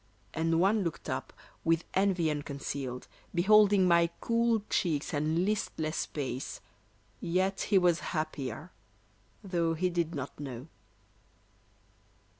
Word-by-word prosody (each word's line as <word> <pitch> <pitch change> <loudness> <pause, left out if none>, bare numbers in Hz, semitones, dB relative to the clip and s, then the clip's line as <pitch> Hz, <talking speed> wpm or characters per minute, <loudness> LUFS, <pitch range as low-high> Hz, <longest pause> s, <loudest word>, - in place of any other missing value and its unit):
And 165 0 +1
one 200 +3 +3
looked 170 -3 -4
up, - - -3 0.3
with 165 0 +2
envy 185 -4 +2
unconcealed, 140 -3 -4 0.3
Beholding 200 +1 +5
my 170 -1 +5
cool 230 -2 +2
cheeks 155 -6 0
and 155 +4 +1
listless 165 -6 -1
pace, 135 -3 -4 0.6
Yet 190 +3 0
he 200 - +5
was 175 -3 +4
happier, 155 0 -4 0.7
though 170 -4 0
he 180 +2 0
did 170 -1 -1
not 140 0 -6
know. 135 0 -7
170 Hz, 110 wpm, -30 LUFS, 150-190 Hz, 0.7 s, Beholding